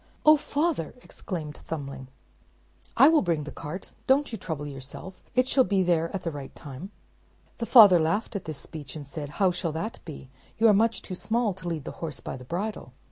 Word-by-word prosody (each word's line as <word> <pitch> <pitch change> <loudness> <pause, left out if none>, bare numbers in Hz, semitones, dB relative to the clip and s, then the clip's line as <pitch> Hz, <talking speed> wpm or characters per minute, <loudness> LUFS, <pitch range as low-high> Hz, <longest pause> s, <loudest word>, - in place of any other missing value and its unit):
"Oh! 305 0 +9
father," 295 - -1
exclaimed 155 -6 -6
Thumbling, 140 -4 -6 0.9
"I 275 - +9
will 320 -1 +5
bring 165 -4 0
the 150 - -7
cart; 155 +6 -7
don't 275 +1 +3
you 225 - -4
trouble 160 -5 -4
yourself; 140 +7 -9
it 255 0 +3
shall 265 0 +4
be 195 -5 +2
there 165 -2 +2
at 195 - -4
the 165 - -2
right 140 -3 -8
time." 145 +6 -9 0.7
The 230 - -2
father 205 -8 +9
laughed 170 +8 0
at 200 - -4
this 155 -3 -5
speech, 145 -1 -9
and 150 -2 -7
said, 145 +1 -6
"How 190 -2 +4
shall 175 -3 -2
that 210 +8 -4
be? 140 -5 -10 0.3
You 225 - +5
are - - +6
much 225 +3 +2
too 185 - -6
small 220 +3 0
to 185 -1 -9
lead 165 -4 -3
the - - -6
horse 155 -5 -4
by - - -6
the 125 - -10
bridle." 175 - -4
175 Hz, 205 wpm, -27 LUFS, 150-215 Hz, 0.9 s, Oh